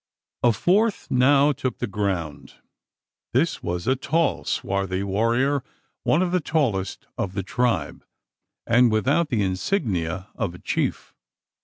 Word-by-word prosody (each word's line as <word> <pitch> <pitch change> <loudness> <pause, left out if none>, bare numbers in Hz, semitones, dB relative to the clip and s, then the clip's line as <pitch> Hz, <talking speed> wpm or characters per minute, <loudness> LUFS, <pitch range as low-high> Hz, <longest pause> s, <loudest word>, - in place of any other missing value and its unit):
A 120 - +5
fourth 195 - +1
now 140 +3 +5
took 130 -2 -3
the - - -2
ground. 95 -7 -3 0.8
This - - +1
was 85 0 -3
a 130 - +3
tall, 155 +4 0
swarthy 95 -1 -1
warrior, 115 +7 +1 0.4
one 170 - +2
of 180 - -1
the 180 - +2
tallest 125 - -1
of 95 - -2
the 100 0 -2
tribe; 125 +5 -1 0.6
and 120 0 +4
without 145 +9 +2
the 110 -4 +1
insignia 95 - -1
of 95 -6 -3
a - - -9
chief. - - -2
115 Hz, 135 wpm, -24 LUFS, 95-140 Hz, 0.8 s, A